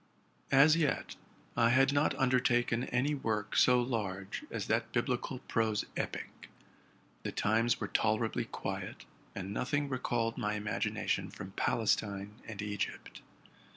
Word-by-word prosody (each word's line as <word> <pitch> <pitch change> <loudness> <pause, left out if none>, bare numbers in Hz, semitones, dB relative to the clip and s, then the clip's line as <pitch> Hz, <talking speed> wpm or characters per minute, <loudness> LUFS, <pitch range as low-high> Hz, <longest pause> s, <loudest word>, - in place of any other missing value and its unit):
As 145 +3 +7
yet, 155 -4 0 0.4
I 115 0 +4
had 135 +3 +4
not 145 +1 +2
undertaken 125 -2 +2
any 135 +5 +1
work 110 -7 -2
so 125 0 +6
large 105 -6 -3
as - - -3
that - - 0
viblical - - -1
prose 110 -2 +1
epic. - - -5 0.7
The - - -3
times 115 +3 +2
were - - -2
tolerably 110 +1 +1
quiet, - - -5 0.3
and 95 0 -4
nothing 145 +5 0
recalled 120 -3 -1
my 105 -2 0
imagination 105 0 -1
from 95 - -8
Palestine 105 -1 0
and 105 -2 -5
Egypt. 105 -1 -4
115 Hz, 125 wpm, -32 LUFS, 105-130 Hz, 0.7 s, As